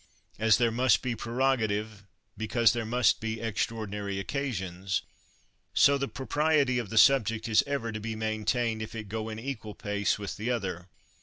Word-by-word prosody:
As 110 -1 +5
there 120 -2 +2
must 125 +1 +3
be 125 -2 -1
prerogative 110 -4 -1 0.3
because 115 +2 +2
there 115 -2 -3
must 120 -1 +3
be 110 0 -3
extraordinary 105 -3 -3
occasions, 95 -7 -3 0.7
so 140 - +6
the 140 0 -1
propriety 140 -1 +1
of 115 -5 -5
the 110 - -4
subject 115 -3 +4
is 110 -2 +4
ever 140 -5 -2
to 110 - -5
be 110 +1 -4
main 110 0 -2
tained 115 -1 0
if 110 - -6
it 110 -3 -6
go 110 +1 -3
in 110 - -6
equal 110 -4 -6
pace 100 -1 -1
with 100 -2 -6
the 110 +4 -3
other. 95 -7 -3
110 Hz, 170 wpm, -29 LUFS, 105-125 Hz, 0.7 s, so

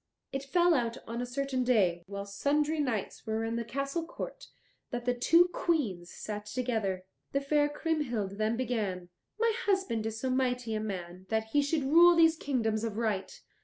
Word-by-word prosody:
It 270 0 -3
fell 345 +5 +3
out 235 -4 0
on 235 +1 -4
a 245 - -3
certain 260 0 -1
day, 195 -9 +3
while 200 0 -5
sundry 295 +9 0
knights 235 -7 -2
were 220 +1 -1
in 225 +1 -2
the 235 - -1
castle 275 +7 -2
court, - - -7 0.4
that 240 0 -4
the 245 - +2
two 335 +8 +5
Queens 210 - 0
sat 210 -1 -6
together. 215 -6 -1 0.3
The 275 - +3
fair 290 +1 +2
Kriemhild 250 -11 -2
then 220 +2 +1
began, 210 -8 -2 0.3
"My 460 0 +3
husband 255 - +1
is 220 0 -4
so 260 +1 -1
mighty 250 -3 0
a 215 - 0
man 185 -3 -6
that 220 0 0
he 290 +5 +3
should 285 +1 0
rule 340 +5 +7
these 325 -1 +6
kingdoms 225 -8 -1
of 220 -2 -3
right." 210 -5 -2
245 Hz, 180 wpm, -30 LUFS, 215-290 Hz, 0.4 s, rule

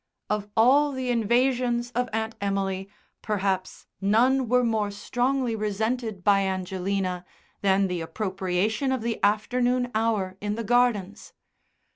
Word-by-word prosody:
Of 210 -1 -2
all 280 +6 +5
the 260 -1 -2
invasions 240 +1 +1
of 250 0 -1
Aunt 220 +1 -2
Emily, 195 -1 -2 0.3
perhaps 195 -3 -2 0.2
none 240 +5 +3
were 250 0 +4
more 220 -3 0
strongly 245 +4 -1
resented 220 0 -2
by 200 0 +5
Angelina 190 -1 -2 0.4
than 195 0 +3
the 180 -2 -2
appropriation 190 +7 -1
of 260 -4 -1
the 230 -1 -3
afternoon 245 +4 +1
hour 215 -4 0
in 210 0 -2
the 230 - -4
gardens. 220 -3 +1
215 Hz, 125 wpm, -26 LUFS, 195-245 Hz, 0.4 s, all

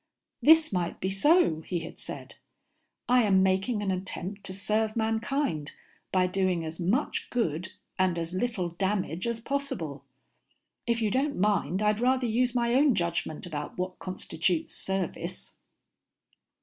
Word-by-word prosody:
"This 320 -4 +6
might 175 -2 -1
be 190 - -1
so," 195 - +4
he 175 +1 -3
had 165 - -9
said. - - -7 0.7
"I 250 0 +5
am 195 -4 +4
making 195 +4 +1
an 195 - 0
attempt 190 +1 -4
to 190 - -4
serve 215 +2 0
mankind 225 - -1 0.4
by 185 -1 +3
doing 185 -2 0
as 160 +1 -6
much 205 - 0
good 180 -6 -1 0.3
and 185 -2 +2
as 165 +1 -3
little 185 -3 -1
damage 185 +1 -1
as 235 -1 -1
possible. 225 - -3 0.8
If 230 -1 +1
you 210 - +1
don't 280 +4 0
mind, 200 -1 +1
I'd 210 0 +2
rather 255 +1 +2
use 245 +2 +1
my 235 -1 +2
own 275 -1 +5
judgment 170 -3 -2
about 150 -4 -5
what 180 0 -3
constitutes 180 -2 -1
service." 190 -3 -3
195 Hz, 145 wpm, -28 LUFS, 180-235 Hz, 0.8 s, This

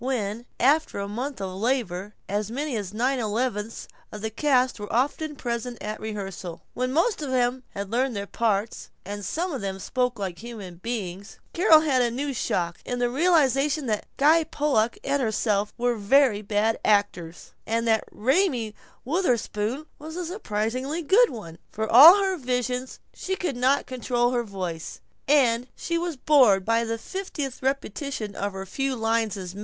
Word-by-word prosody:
When, 235 -2 -2
after 295 +2 +3
a 200 0 -3
month 250 +6 -4
of 190 -1 -4
labor, 210 -5 -1
as 205 +1 -2
many 280 +3 -3
as 200 -4 -4
nine 250 +5 0
elevenths 225 -1 -2 0.3
of 210 - -8
the 220 0 -3
cast 255 0 +2
were 205 - -6
often 290 +5 0
present 240 -1 -4
at 215 +1 -5
a - - -16
rehearsal; 195 -5 -6
when 255 +1 -1
most 340 - +1
of 290 - -3
them 255 0 +1
had 200 0 -5
learned 250 +1 0
their 200 0 -3
parts 215 0 -1 0.2
and 205 +1 -6
some 340 - -2
of 270 - -4
them 195 -1 -3
spoke 250 +4 -1
like 190 -4 -4
human 210 -7 -8
beings, 200 -2 -5 0.2
Carol 330 -3 +6
had 275 -5 +2
a 240 - +2
new 275 +4 -3
shock 175 -8 -1
in 245 - -3
the 245 0 0
realization 295 -1 +2
that 215 -3 -2
Guy 315 +4 +5
Pollock 280 -7 0
and 280 0 0
herself 210 -3 0
were 245 0 +1
very 220 +1 +3
bad 215 +2 0
actors, 190 -5 0 0.2
and 230 +1 0
that 220 -1 +3
Raymie 255 - +1 0.3
Wutherspoon 255 - -1
was 315 +2 -8
a 360 0 -3
surprisingly 265 - -2
good 450 +10 +5
one. 170 -8 -9
For 220 +1 -2
all 290 - +10
her 380 -1 0
visions 250 -1 -2
she 380 - -3
could 355 -8 -3
not 260 +3 +2
control 245 -1 0
her 245 -1 0
voice, 185 -6 -5 0.3
and 250 -4 +3
she 335 0 -2
was 340 -4 -3
bored 250 -10 +5
by 230 +1 +2
the 230 0 -2
fiftieth 290 - -5
repetition 265 -4 -3
of 200 0 -3
her 190 0 -6
few 270 +7 -2
lines 225 -2 0
as 180 -2 -6
maid. 200 - -9
240 Hz, 175 wpm, -25 LUFS, 210-275 Hz, 0.3 s, all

